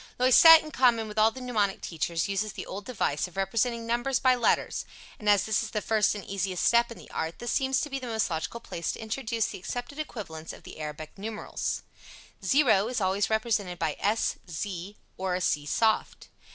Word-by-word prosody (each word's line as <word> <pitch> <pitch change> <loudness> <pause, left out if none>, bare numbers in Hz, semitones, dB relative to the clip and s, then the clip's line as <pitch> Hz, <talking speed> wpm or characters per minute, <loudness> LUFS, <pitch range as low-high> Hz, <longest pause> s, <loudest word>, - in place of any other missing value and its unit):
Loisette, 315 +6 +8
in 310 - -9
common 235 -5 +3
with 210 0 -3
all 215 +1 +6
the 260 - -10
mnemonic 215 -6 0
teachers, 165 +2 -2
uses 200 +1 -2
the - - -6
old 200 +2 -7
device 190 - -1
of 180 - -16
representing 230 +4 0
numbers 240 +3 0
by 255 -1 +4
letters 245 -2 +1 0.4
and 210 - 0
as 205 -2 +5
this 220 -1 +1
is 225 - -4
the 215 - -2
first 215 0 +2
and 205 - -7
easiest 190 -2 -2
step 235 0 +4
in 230 - -8
the - - -14
art, 160 +1 -3
this 240 0 -4
seems 265 -1 +1
to - - -2
be 275 -2 -4
the 255 - -7
most 220 -2 0
logical 165 +6 -3
place 170 -7 -4
to - - -8
introduce 225 0 -2
the - - -7
accepted 245 - -6
equivalents 165 - -6
of - - -13
the - - -11
Arabic 155 0 -7
numerals: 215 +1 -4 0.6
0 240 -8 +4
is 245 -1 -2
always 195 +1 +1
represented 220 -5 0
by 160 -3 -1
s, 215 +3 +1
z 185 +3 -5 0.2
or 185 -1 -1
c 150 -4 0
soft. 220 +7 0
215 Hz, 205 wpm, -28 LUFS, 185-240 Hz, 0.6 s, Loisette